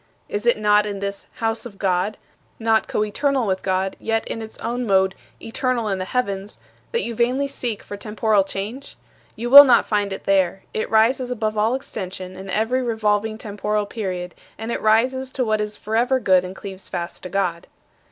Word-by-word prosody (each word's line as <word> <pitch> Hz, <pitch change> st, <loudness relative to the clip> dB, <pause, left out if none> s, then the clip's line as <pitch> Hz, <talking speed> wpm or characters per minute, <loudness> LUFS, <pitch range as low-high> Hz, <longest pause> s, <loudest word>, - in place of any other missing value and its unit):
Is 210 Hz, +3 st, -3 dB
it 240 Hz, -, +4 dB
not 210 Hz, 0 st, +3 dB
in 200 Hz, -1 st, -4 dB
this 200 Hz, 0 st, -5 dB
'house 225 Hz, -1 st, -2 dB
of 215 Hz, -5 st, -9 dB
God' 190 Hz, +2 st, 0 dB, 0.4 s
not 225 Hz, -1 st, +2 dB
coeternal 255 Hz, +5 st, 0 dB
with 190 Hz, -2 st, -1 dB
God, 190 Hz, 0 st, -1 dB
yet 225 Hz, 0 st, -1 dB
in 225 Hz, -, -4 dB
its 220 Hz, 0 st, -8 dB
own 240 Hz, +1 st, -3 dB
mode 190 Hz, -1 st, +3 dB, 0.3 s
'eternal 235 Hz, 0 st, -1 dB
in 195 Hz, -1 st, -1 dB
the 185 Hz, -, -2 dB
heavens' 200 Hz, -3 st, -2 dB, 0.3 s
that 470 Hz, -, 0 dB
you 235 Hz, -, -3 dB
vainly 250 Hz, +5 st, +1 dB
seek 240 Hz, -6 st, -3 dB
for 205 Hz, -, -7 dB
temporal 210 Hz, -1 st, +1 dB
change? 210 Hz, +8 st, -6 dB, 0.4 s
You 240 Hz, +2 st, -4 dB
will 285 Hz, +1 st, +13 dB
not 250 Hz, -4 st, +5 dB
find 205 Hz, -2 st, 0 dB
it 190 Hz, -, -5 dB
there. 195 Hz, -1 st, +1 dB
It 215 Hz, -, -2 dB
rises 245 Hz, +3 st, +3 dB
above 220 Hz, -3 st, -2 dB
all 220 Hz, +4 st, +2 dB
extension 185 Hz, -7 st, -6 dB
and 190 Hz, +1 st, -9 dB
every 225 Hz, +6 st, +1 dB
revolving 220 Hz, -2 st, 0 dB
temporal 210 Hz, 0 st, -2 dB
period, 185 Hz, -4 st, -4 dB, 0.2 s
and 225 Hz, +2 st, -5 dB
it -, -, -2 dB
rises 255 Hz, +5 st, +2 dB
to 255 Hz, -, 0 dB
what 215 Hz, -1 st, +1 dB
is 210 Hz, 0 st, -4 dB
forever 240 Hz, +5 st, +1 dB
good 185 Hz, -6 st, +4 dB
and 185 Hz, +1 st, -7 dB
cleaves 190 Hz, -1 st, -9 dB
fast 170 Hz, -1 st, -5 dB
to 180 Hz, -, -7 dB
God." 175 Hz, -3 st, -1 dB
215 Hz, 190 wpm, -22 LUFS, 195-235 Hz, 0.4 s, will